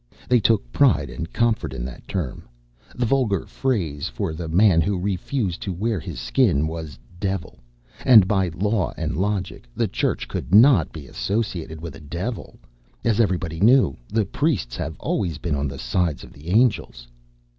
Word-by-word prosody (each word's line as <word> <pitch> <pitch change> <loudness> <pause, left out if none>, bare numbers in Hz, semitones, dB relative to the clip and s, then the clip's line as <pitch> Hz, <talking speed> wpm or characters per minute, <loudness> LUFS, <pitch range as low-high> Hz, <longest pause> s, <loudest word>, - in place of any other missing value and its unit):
They 125 -1 +4
took 105 - +1
pride - - +3
and 85 +2 -6
comfort 115 - 0
in - - -4
that - - -9
term. 85 -10 -4 0.5
The 125 - 0
vulgar 115 -6 +1
phrase 100 - -2
for 80 - -3
the 80 +1 -5
man 90 +1 +4
who 95 +4 0
refused 95 +1 -2
to 100 - -3
wear 105 +3 -1
his - - -7
Skin 70 +4 +2
was 80 -4 -6 0.2
"devil," 95 -8 -3 0.4
and, 110 -7 +7
by 95 -2 +2
law 95 +3 -1
and - - -2
logic, 95 -5 -2
the - - +1
Church - - -1
could 95 - -1
not 115 - +6
be 75 -3 -9
associated 90 - -3
with 80 -4 -7
a - - -11
devil. 90 +10 -5 0.5
As 115 -2 +1
everybody 90 -6 0
knew, 115 - +5
the 110 -1 +1
priests 130 - -1
have 80 - -5
always 85 -7 -1
been 85 - -3
on 70 0 -1
the 70 0 -6
side 75 +5 -1
of - - -13
the 75 +3 -14
angels. 100 - +1
90 Hz, 170 wpm, -23 LUFS, 80-110 Hz, 0.5 s, and